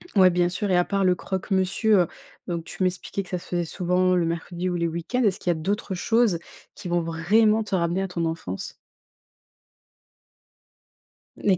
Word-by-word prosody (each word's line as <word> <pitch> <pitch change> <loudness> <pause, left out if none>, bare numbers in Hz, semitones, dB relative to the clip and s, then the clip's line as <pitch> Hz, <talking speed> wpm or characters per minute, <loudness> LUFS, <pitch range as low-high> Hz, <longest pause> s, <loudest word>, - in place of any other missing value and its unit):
Ouais, 185 -2 +7
bien 175 0 +2
sûr 185 +2 -2
et 180 - +4
à 180 - +3
part 200 -1 0
le 180 -1 +4
croque-monsieur, 190 +3 +1
heu, - - -5 0.4
donc 170 -2 -3
tu 180 - -9
m'expliquais 185 +2 -2
que 185 - -16
ça 180 - -1
se - - -11
faisait 175 -1 -1
souvent 180 +2 +1
le 175 -2 +2
mercredi 170 +2 -3
ou 175 - -2
les 170 -1 0
week-ends. 170 +10 -2
Est-ce 200 -4 +2
qu'il 180 - -3
y - - +6
a - - +3
d'autres 200 +3 -2
choses, 225 -1 +2 0.3
qui 180 - -8
vont 175 0 +1
vraiment 210 +7 +3
te 195 -2 -2
ramener 175 +2 0
à - - -2
ton 170 -2 -2
enfance? 160 - -4 2.6
Les 190 -3 +2
180 Hz, 190 wpm, -25 LUFS, 170-195 Hz, 2.6 s, Ouais